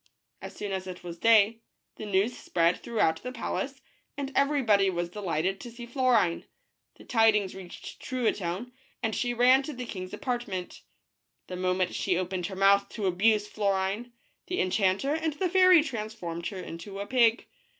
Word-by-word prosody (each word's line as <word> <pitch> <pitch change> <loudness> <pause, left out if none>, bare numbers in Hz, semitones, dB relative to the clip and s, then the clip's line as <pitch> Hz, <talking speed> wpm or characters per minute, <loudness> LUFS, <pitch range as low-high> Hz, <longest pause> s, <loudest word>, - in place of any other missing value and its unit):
As - - -8
soon 205 -1 -5
as 190 -1 -3
it 180 -1 -8
was 170 -1 -8
day, 225 -1 +5 0.4
the 215 - -6
news 200 +5 +1
spread 170 -4 +1
throughout 165 -9 0
the 250 - -5
palace, 270 +2 -4 0.3
and 280 -1 -4
everybody 260 -9 +3
was 175 -1 -2
delighted 190 -1 -2
to 240 - -8
see 235 +1 -9
Florine. 240 -8 +1 0.5
The - - -15
tidings 220 -5 +3
reached 185 -2 -10
Truitonne, 230 -3 -2 0.3
and 220 -1 0
she 245 -1 -1
ran 255 +3 +5
to 295 +2 -6
the 250 -1 -6
king's 185 -5 -6
apart 245 -2 -3
ment. 185 -3 -6 0.6
The 180 - -7
moment 185 0 0
she 185 -3 0
opened 180 -1 -2
her 190 - -7
mouth 200 +1 +4
to 215 -3 -3
abuse 210 +3 +2
Florine, 200 +3 -1 0.4
the 365 - -2
enchanter 190 +8 +1
and 320 0 -1
the 365 +6 -1
fairy 370 -2 +6
transformed 215 - -5
her 195 - -6
into 185 +2 -7
a 200 - -3
pig. 235 -1 +3
210 Hz, 170 wpm, -28 LUFS, 185-245 Hz, 0.6 s, fairy